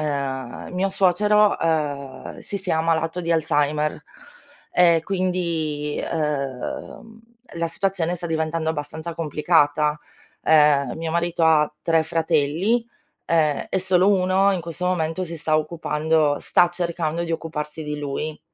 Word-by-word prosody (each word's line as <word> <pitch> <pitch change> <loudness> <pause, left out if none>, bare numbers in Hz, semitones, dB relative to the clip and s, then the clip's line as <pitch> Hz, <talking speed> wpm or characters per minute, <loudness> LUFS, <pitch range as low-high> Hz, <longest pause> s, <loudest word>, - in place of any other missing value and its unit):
uhm, 135 -4 -3
mio 185 +2 0
suocero, 205 +3 +3
uhm, 145 -4 -2
si 200 - -5
sia 180 -4 -1
ammalato 165 +1 0
di 170 0 -3
Alzheimer, 150 -1 +1 0.7
e 170 -2 +4
quindi, 170 -6 -1
uhm, 150 - -4 0.4
la 170 0 0
situazione 180 -1 -1
sta 170 - -5
diventando 160 0 -1
abbastanza 160 +2 -5
complicata. 150 -1 +2 0.5
Ehm, 150 -3 +4
mio 160 0 -3
marito 170 0 0
ha 155 -2 +4
tre 165 -1 +3
fratelli, 165 +7 +1 0.4
e 155 -3 +1
e - - 0
solo 185 +1 +3
uno 190 0 +3
in 185 - -1
questo 170 +2 -4
momento 175 0 -1
si 170 -1 -5
sta 155 0 +1
occupando 155 -1 0
sta 175 -1 +3
cercando 170 -2 -2
di 165 - -3
occuparsi 155 -1 -4
di 150 -1 -4
lui. 150 +2 -4
160 Hz, 130 wpm, -23 LUFS, 150-175 Hz, 0.7 s, e